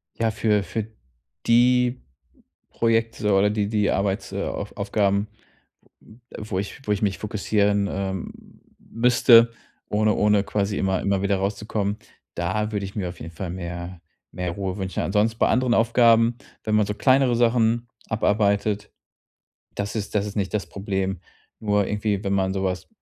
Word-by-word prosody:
Ja, 115 Hz, -1 st, 0 dB
für 105 Hz, -2 st, +1 dB
für 110 Hz, 0 st, -4 dB, 0.6 s
die 125 Hz, +1 st, +3 dB, 0.7 s
Projekte 115 Hz, -2 st, 0 dB
oder 100 Hz, +2 st, +4 dB
die 105 Hz, -1 st, 0 dB
die 105 Hz, -2 st, +1 dB
Arbeits 100 Hz, +1 st, -1 dB
äh, 100 Hz, 0 st, -3 dB
Auf 100 Hz, -, -5 dB
Aufgaben, 100 Hz, 0 st, +1 dB, 0.7 s
m 115 Hz, +3 st, -18 dB, 0.3 s
wo 95 Hz, -, -1 dB
ich 100 Hz, +7 st, -5 dB
wo 105 Hz, -, +1 dB
ich 105 Hz, -, -1 dB
mich 100 Hz, -2 st, 0 dB
fokussieren, 100 Hz, -1 st, 0 dB
ähm, 95 Hz, -2 st, -4 dB, 0.5 s
müsste, 115 Hz, 0 st, +5 dB, 0.4 s
ohne 105 Hz, +1 st, +2 dB
ohne 105 Hz, -1 st, +3 dB
quasi 100 Hz, 0 st, -1 dB
immer 95 Hz, -1 st, 0 dB
immer 100 Hz, -1 st, 0 dB
wieder 100 Hz, 0 st, +1 dB
rauszukommen, 100 Hz, +1 st, -2 dB, 0.4 s
da 105 Hz, +5 st, -2 dB
würde 100 Hz, -1 st, -2 dB
ich 95 Hz, -, -7 dB
mir 95 Hz, -4 st, -2 dB
auf 90 Hz, -, -10 dB
jeden 80 Hz, +2 st, -8 dB
Fall 85 Hz, +1 st, -5 dB
mehr 85 Hz, 0 st, -6 dB, 0.3 s
mehr 90 Hz, -1 st, -3 dB
Ruhe 95 Hz, 0 st, -4 dB
wünschen. 95 Hz, -2 st, -3 dB
Ansonsten 110 Hz, +3 st, +1 dB
bei -, -, +3 dB
anderen 125 Hz, -2 st, +2 dB
Aufgaben, 115 Hz, 0 st, +4 dB, 0.3 s
wenn 110 Hz, -, 0 dB
man 105 Hz, -2 st, +3 dB
so 105 Hz, -, -3 dB
kleinere 130 Hz, +1 st, +3 dB
Sachen 120 Hz, 0 st, +2 dB, 0.2 s
abarbeitet, 105 Hz, -1 st, +1 dB, 0.8 s
das 100 Hz, +1 st, -4 dB
ist 105 Hz, -1 st, -4 dB
das 105 Hz, 0 st, +1 dB
ist 105 Hz, -, -7 dB
nicht 95 Hz, -1 st, -2 dB
das 105 Hz, -, -1 dB
Problem. 95 Hz, -2 st, -3 dB, 0.4 s
Nur 105 Hz, -2 st, +1 dB
irgendwie, 105 Hz, -1 st, -1 dB
wenn 100 Hz, -, -1 dB
man 95 Hz, -1 st, +1 dB
so 95 Hz, 0 st, -2 dB
was- 90 Hz, -1 st, -3 dB
105 Hz, 160 wpm, -24 LUFS, 95-110 Hz, 0.8 s, müsste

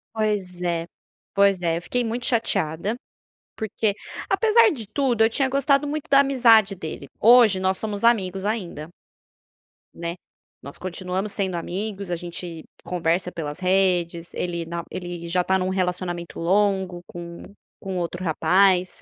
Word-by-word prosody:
Pois 205 Hz, -5 st, -1 dB
é, 170 Hz, -2 st, -1 dB, 0.5 s
pois 200 Hz, -2 st, +4 dB
é 165 Hz, -2 st, +1 dB
eu 170 Hz, -, -5 dB
fiquei 245 Hz, +7 st, -1 dB
muito 235 Hz, +2 st, -2 dB
chateada, 200 Hz, -3 st, 0 dB, 0.6 s
porque 215 Hz, -1 st, -1 dB, 0.3 s
Apesar 455 Hz, 0 st, +5 dB
de 235 Hz, -8 st, -5 dB
tudo, 240 Hz, -1 st, +1 dB
eu 225 Hz, -, +4 dB
tinha 265 Hz, +3 st, +1 dB
gostado 275 Hz, +1 st, +2 dB
muito 300 Hz, 0 st, -4 dB
da 275 Hz, 0 st, +7 dB
amizade 230 Hz, -7 st, +5 dB
dele, 160 Hz, -5 st, -7 dB
hoje, 225 Hz, -4 st, +6 dB
nós 190 Hz, 0 st, 0 dB
somos 210 Hz, -2 st, -4 dB
amigos 195 Hz, -5 st, +2 dB
ainda 185 Hz, -8 st, -3 dB, 1.1 s
né. 170 Hz, +1 st, -5 dB, 0.5 s
Nós 140 Hz, -, -10 dB
continuamos 185 Hz, +2 st, -3 dB
sendo 190 Hz, -2 st, -2 dB
amigos, 195 Hz, +3 st, -4 dB
a 175 Hz, -, 0 dB
gente 170 Hz, -1 st, -7 dB, 0.2 s
conversa 175 Hz, 0 st, -1 dB
pelas 150 Hz, 0 st, -5 dB
redes, 180 Hz, -3 st, +1 dB
ele 170 Hz, -2 st, -3 dB
na 170 Hz, 0 st, -5 dB
ele 175 Hz, -2 st, -6 dB
já 180 Hz, +1 st, +1 dB
tá 190 Hz, +1 st, +2 dB
em -, -, -3 dB
um 185 Hz, -, 0 dB
relacionamento 180 Hz, -2 st, -3 dB
longo 190 Hz, 0 st, +1 dB
com 170 Hz, 0 st, -9 dB, 0.4 s
com 190 Hz, -1 st, -5 dB
outro 175 Hz, +1 st, -3 dB
rapaz. 180 Hz, +3 st, +2 dB
185 Hz, 150 wpm, -23 LUFS, 175-215 Hz, 1.1 s, da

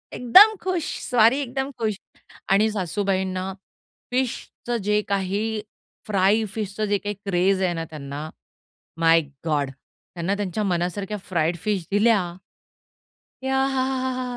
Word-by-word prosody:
एकदम 385 Hz, -, +8 dB
खुश 365 Hz, -4 st, -1 dB, 0.3 s
स्वारी 240 Hz, +2 st, +5 dB
एकदम 265 Hz, +1 st, -3 dB
खुश 220 Hz, -3 st, -1 dB, 0.5 s
आणि 210 Hz, +3 st, +4 dB
सासूबाईंना 190 Hz, -1 st, -1 dB, 0.6 s
फिशचं 245 Hz, -1 st, -2 dB
जे 210 Hz, +1 st, +2 dB
काही, 200 Hz, +3 st, -1 dB, 0.5 s
फ्राय 205 Hz, +2 st, +3 dB
फिशचं 215 Hz, 0 st, -3 dB
जे 205 Hz, 0 st, +1 dB
काही 205 Hz, +2 st, -4 dB
क्रेझ 190 Hz, +1 st, +2 dB
आहे 180 Hz, -2 st, +1 dB
ना 165 Hz, -1 st, -3 dB
त्यांना 150 Hz, 0 st, -6 dB, 0.7 s
माय 165 Hz, 0 st, +5 dB, 0.2 s
गॉड. 145 Hz, -3 st, +1 dB, 0.5 s
त्यांना 180 Hz, +4 st, -1 dB
त्यांच्या 205 Hz, 0 st, -2 dB
मनासारख्या 190 Hz, +2 st, -1 dB
फ्राईड 170 Hz, -3 st, -1 dB
फिश 200 Hz, -3 st, -1 dB
दिल्या. 215 Hz, +2 st, +4 dB, 1.3 s
याहांहां. 260 Hz, -1 st, 0 dB
205 Hz, 115 wpm, -24 LUFS, 185-235 Hz, 1.3 s, एकदम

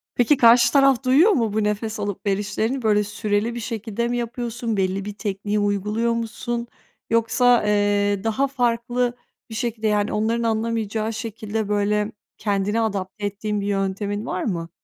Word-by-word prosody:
Peki, 250 Hz, +4 st, +3 dB
karşı 235 Hz, 0 st, +6 dB
taraf 275 Hz, -2 st, +4 dB
duyuyor 295 Hz, +12 st, +5 dB
mu 230 Hz, -, +1 dB
bu 215 Hz, -1 st, +1 dB
nefes 210 Hz, +1 st, -2 dB
alıp 205 Hz, -1 st, -4 dB
verişlerini? 210 Hz, +6 st, -1 dB
Böyle 210 Hz, -2 st, +3 dB
süreli 210 Hz, +2 st, -1 dB
bir -, -, -3 dB
şekilde 230 Hz, 0 st, -3 dB
mi 245 Hz, 0 st, -1 dB
yapıyorsun? 235 Hz, -1 st, -3 dB
Belli 190 Hz, +1 st, 0 dB
bir 210 Hz, -, -5 dB
tekniği 205 Hz, 0 st, -2 dB
uyguluyor 210 Hz, +3 st, 0 dB
musun? 235 Hz, +1 st, -3 dB, 0.4 s
Yoksa, 230 Hz, +1 st, +3 dB
eee, 205 Hz, -1 st, +2 dB
daha 225 Hz, +5 st, +1 dB
farklı 245 Hz, -1 st, 0 dB, 0.4 s
bir 220 Hz, -, -7 dB
şekilde, 225 Hz, -2 st, -2 dB
yani 210 Hz, 0 st, +1 dB
onların 225 Hz, +2 st, 0 dB
anlamayacağı 225 Hz, -1 st, -1 dB
şekilde 220 Hz, -1 st, -4 dB
böyle 210 Hz, +1 st, +1 dB, 0.3 s
kendini 205 Hz, +1 st, 0 dB
adapte 205 Hz, -1 st, -3 dB
ettiğin 205 Hz, +1 st, -2 dB
bir 200 Hz, -, -3 dB
yöntemin 200 Hz, +1 st, -2 dB
var 185 Hz, -6 st, -3 dB
mı? 170 Hz, -6 st, -3 dB
220 Hz, 155 wpm, -23 LUFS, 205-235 Hz, 0.4 s, karşı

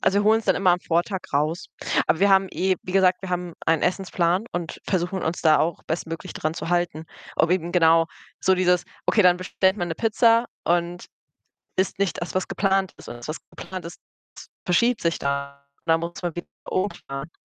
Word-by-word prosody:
Also, 190 Hz, +1 st, +3 dB
wir 205 Hz, -, -1 dB
holen's 220 Hz, +1 st, +4 dB
dann 190 Hz, -, +3 dB
immer 185 Hz, -2 st, +3 dB
am 180 Hz, -, 0 dB
Vortag 175 Hz, +4 st, 0 dB
raus. 155 Hz, +4 st, 0 dB, 0.4 s
Aber -, -, +2 dB
wir 200 Hz, -, +5 dB
haben 195 Hz, -1 st, +4 dB
eh 185 Hz, 0 st, +1 dB
wie 185 Hz, -, -6 dB
gesagt, 185 Hz, -1 st, +3 dB
wir 190 Hz, -, -6 dB
haben 180 Hz, -1 st, -3 dB
einen 165 Hz, -1 st, +3 dB
Essensplan 180 Hz, +1 st, +1 dB
und 175 Hz, -2 st, -4 dB
versuchen 185 Hz, 0 st, -1 dB
uns 160 Hz, +2 st, -2 dB
da 155 Hz, -2 st, +5 dB
auch 165 Hz, 0 st, 0 dB
bestmöglich 165 Hz, 0 st, -4 dB
dran 155 Hz, +1 st, -2 dB
zu -, -, -5 dB
halten. 175 Hz, -3 st, 0 dB, 0.3 s
Ob 165 Hz, -, +3 dB
eben 175 Hz, -2 st, 0 dB
genau 165 Hz, -1 st, +5 dB, 0.3 s
so 190 Hz, -, +4 dB
dieses: 180 Hz, -1 st, +2 dB, 0.2 s
„Okay, 210 Hz, -, +4 dB
dann 180 Hz, -1 st, +6 dB
bestellt 185 Hz, 0 st, -10 dB
bestellt 190 Hz, +1 st, +4 dB
man 175 Hz, -, -1 dB
'ne 165 Hz, -, -2 dB
Pizza 230 Hz, +2 st, +3 dB, 0.2 s
und 175 Hz, +1 st, 0 dB, 0.7 s
isst 190 Hz, +1 st, 0 dB
nicht 200 Hz, -3 st, 0 dB
das, 170 Hz, -, -4 dB
was 185 Hz, -1 st, -1 dB
geplant 195 Hz, -1 st, +1 dB
ist.“ -, -, -11 dB
Und -, -, -7 dB
das, 120 Hz, -, -9 dB
was 155 Hz, -, -3 dB, 0.2 s
geplant 185 Hz, -2 st, -7 dB
ist, 170 Hz, -, -9 dB, 0.7 s
verschiebt 235 Hz, +7 st, +3 dB
sich 170 Hz, 0 st, 0 dB
dann 140 Hz, 0 st, -2 dB
und 140 Hz, 0 st, -36 dB
dann 165 Hz, 0 st, +4 dB
muss 170 Hz, +2 st, -6 dB
man 175 Hz, -2 st, -2 dB
wieder 175 Hz, -, -6 dB, 0.2 s
umplanen. 170 Hz, -6 st, -3 dB
175 Hz, 205 wpm, -24 LUFS, 165-190 Hz, 0.7 s, dann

